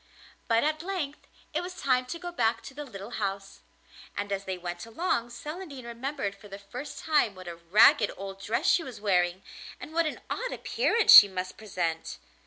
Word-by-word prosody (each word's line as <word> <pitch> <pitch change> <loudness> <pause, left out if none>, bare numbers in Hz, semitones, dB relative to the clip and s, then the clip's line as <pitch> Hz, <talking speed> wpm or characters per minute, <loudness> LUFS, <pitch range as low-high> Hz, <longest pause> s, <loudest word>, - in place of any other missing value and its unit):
But 230 -1 +3
at 310 +1 0
length 340 -6 -4 0.3
it - - 0
was 360 +1 -7
time 255 -2 +1
to 335 - -5
go 350 +1 -6
back 230 -9 0
to - - -9
the 295 +2 -7
little 200 -3 -9
house, 195 0 -4 0.6
and 205 0 -3
as 195 0 -2
they 190 -1 -3
went 175 0 -6
along 240 -2 -1
Celandine 295 +1 -8
remembered 235 -2 -4
for 205 - -15
the 195 0 -8
first 245 +8 -8
time 295 -10 +2
what 185 -1 -11
a 170 - -5
ragged 195 +5 +5
old 195 0 -7
dress 230 - -1
she 375 - +4
was 250 -7 -9
wearing, 185 -2 +1 0.4
and 310 - -9
what 335 -1 +2
an - - -5
odd - - -3
appearance 465 -3 +3
she 205 - +12
must 185 -1 -5
present. 175 -6 -3
230 Hz, 190 wpm, -28 LUFS, 195-300 Hz, 0.6 s, she